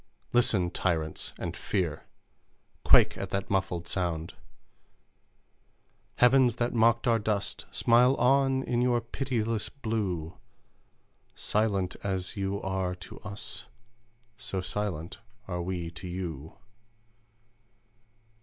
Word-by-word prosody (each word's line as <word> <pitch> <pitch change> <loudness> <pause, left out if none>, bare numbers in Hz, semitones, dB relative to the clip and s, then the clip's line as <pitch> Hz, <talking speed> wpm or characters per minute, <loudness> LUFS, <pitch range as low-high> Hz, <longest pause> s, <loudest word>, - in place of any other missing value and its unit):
Listen, 100 -7 +3
tyrants, 80 -5 -1
and - - -4
fear! 85 -7 -2 0.8
Quake - - +6
at - - -4
that 100 0 -2
muffled 90 -3 0
sound 85 -2 -2 1.8
"Heavens 125 -1 +5
that 120 0 -1
mocked 115 +1 +3
our 115 -1 +4
dust, 105 -2 -2
Smile 125 +3 +4
on, 135 +1 +3
in 120 -2 0
your 125 -1 +3
pitiless 115 -3 -2
blue! 100 - -3 1.0
Silent 100 -4 0
as 95 +1 -2
you 100 0 -1
are 95 -1 -1
to 90 - -11
us, 105 -1 -5 0.7
So 95 - -2
silent 90 -4 -3 0.3
are 90 -2 -3
we 85 -2 -3
to 85 +2 -7
you! 85 -5 -5
100 Hz, 105 wpm, -29 LUFS, 90-115 Hz, 1.8 s, Quake